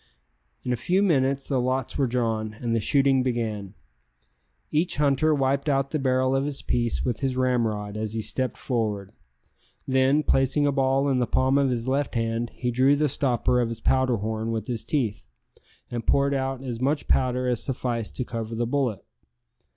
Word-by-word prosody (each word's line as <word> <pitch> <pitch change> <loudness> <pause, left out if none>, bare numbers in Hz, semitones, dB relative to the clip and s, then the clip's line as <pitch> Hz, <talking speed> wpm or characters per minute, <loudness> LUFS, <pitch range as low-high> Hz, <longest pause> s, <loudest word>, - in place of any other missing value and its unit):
In 125 - -1
a 120 - -4
few 185 +8 +2
minutes 135 -6 +1
the 135 -3 +1
lots 130 0 -1
were 140 -2 +1
drawn, 110 -3 -1
and 115 +1 -2
the - - +2
shooting 135 +3 +3
began. 110 -6 -3 1.0
Each 155 0 0
hunter 145 +1 +3
wiped 140 +1 0
out 135 -1 +1
the 155 - 0
barrel 130 0 +1
of 135 +1 +1
his 145 -2 -4
piece 120 -1 -1
with 120 -3 -1
his 130 -2 -1
ramrod 115 -5 0
as 110 0 -3
he 110 - -1
stepped 130 +3 -1
forward; 105 -6 -2 0.8
then, 130 +3 +3
placing 135 +2 +2
a 145 - +3
ball 135 0 +2
in 135 -2 +2
the 120 - +1
palm 130 +2 +2
of 140 -1 +2
his 120 -1 -2
left 135 +1 -1
hand, 115 0 -1
he 125 -1 -2
drew 130 +4 +4
the 150 +1 +2
stopper 125 -3 +1
of 120 - 0
his 115 -1 -5
powder 130 0 +2
horn 110 +2 -3
with 110 -2 -3
his 115 -2 -3
teeth, 110 - -2 0.6
and 120 -1 -4
poured 140 0 +3
out 135 -1 -2
as 120 -3 -5
much 145 +3 0
powder 125 0 +1
as 120 -2 0
sufficed 120 -4 -3
to 125 - -2
cover 115 -1 -5
the 120 +1 0
bullet. 125 -5 -1
130 Hz, 190 wpm, -25 LUFS, 115-135 Hz, 1.0 s, drew